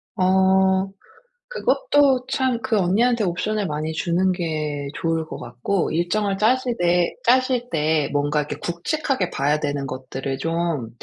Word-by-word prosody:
어. 190 +1 +3 0.6
그것도 290 - +2
참 260 -3 0
그 245 -3 0
언니한테 220 +6 +2
옵션을 205 +4 -1
많이 155 +1 -3
주는 175 +3 +1
게 155 -5 -3
좋을 165 -2 -1
것 - - -7
같고 125 +10 -2
일정을 195 +4 0
짜시되 215 -7 +2
짜실 250 0 +2
때 155 -1 +1
뭔가 145 +1 +1
이렇게 150 - -4
굵직하게 185 - -2
봐야 145 +2 0
되는 145 -2 -2
것들을 130 +1 -5
좀 165 -5 -2
175 Hz, 265 characters per minute, -22 LUFS, 155-220 Hz, 0.6 s, 어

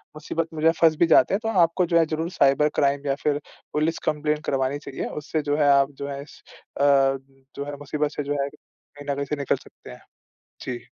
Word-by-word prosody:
मुसीबत 165 +1 -3
में 155 - -5
जो 160 - +4
है 165 - +5
फँस 160 -1 +6
भी 170 - +5
जाते 165 - +5
हैं, 200 - +2
तो 225 - -1 0.2
आपको 175 +2 0
जो 170 -1 +3
है 165 - +4
ज़रूर 160 +2 -3
साइबर 140 +2 +4
क्राइम 140 0 +1
या 135 - +1
फिर 145 -1 +1 0.3
पुलिस 155 +2 0
कंप्लेन 150 0 -1
करवानी 135 +1 0
चाहिए। 135 - -4 0.2
उससे 155 +1 -2
जो 145 - +2
है 145 -2 +4
आप 140 0 +4
जो 140 - -3
है 140 0 -5
इस 145 - -14 0.4
अ, - - +2 0.7
जो 140 - -4
है 145 - -5
मुसीबत 145 +1 -2
से 145 - -2
जो 145 0 -1
है 140 - -3 0.5
कहीं 145 - -10
न - - -1
कहीं 140 - -2
से 150 - -2
निकल 140 -2 0
सकते - - -15
हैं। 60 - -12 0.6
जी। 125 -1 -4
145 Hz, 235 wpm, -24 LUFS, 140-155 Hz, 0.7 s, फँस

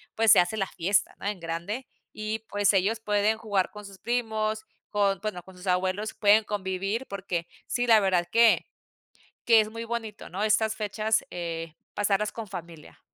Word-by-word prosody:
pues, 225 -1 +5
se - - +8
hace 175 +4 +2
la 195 -3 -1
fiesta, 190 +3 0
¿no? - - -8
En 205 -2 -2
grande, 170 +10 -4 0.3
y 215 +1 -3
pues, 205 0 +3
ellos 205 +4 +1
pueden 210 0 +2
jugar 205 -4 0
con 210 0 -10
sus 200 -1 -11
primos, 220 -1 -1 0.2
con 200 -3 +1
bueno 210 -4 -3
con 185 +2 -15
sus 180 +2 -11
abuelos 185 +4 0
pueden 210 +1 +5
convivir, 200 +3 -2
porque 185 -4 -3 0.2
sí 245 0 -1
la 225 -2 +7
verdad 180 -3 +2
que 230 0 +5 0.8
que 230 -2 +7
es 215 - -3
muy 230 +1 -6
bonito, 225 -2 -5
¿no? 195 +4 -3
Estas 220 +1 +2
fechas, 215 +1 0
eh, 165 -2 -5 0.2
pasarlas 205 0 +1
con 225 -2 -7
familia. 170 -4 -9
205 Hz, 180 wpm, -27 LUFS, 185-220 Hz, 0.8 s, se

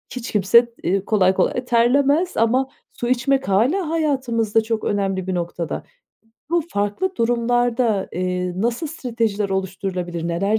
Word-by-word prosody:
hiç 250 -1 -5
kimse, 230 +4 +4
eee, 190 +2 0
kolay 190 -4 +3
kolay 250 +6 0
terlemez 280 +8 +2
ama 245 +4 +2 0.3
su 240 - -4
içmek 265 +1 +1
hâlâ 265 - +2
hayatımızda 255 -9 +1
çok 220 0 -2
önemli 195 -2 -1
bir 185 - -1
noktada. 170 -1 -3 0.7
Bu 340 -1 +2
farklı 245 - -2
durumlarda, 235 -2 +1
eee, 180 0 -2
nasıl 235 - -1
stratejiler 230 -8 -2
oluşturulabilir, 185 -3 -3
neler 195 +6 +1
225 Hz, 130 wpm, -21 LUFS, 190-250 Hz, 0.7 s, kimse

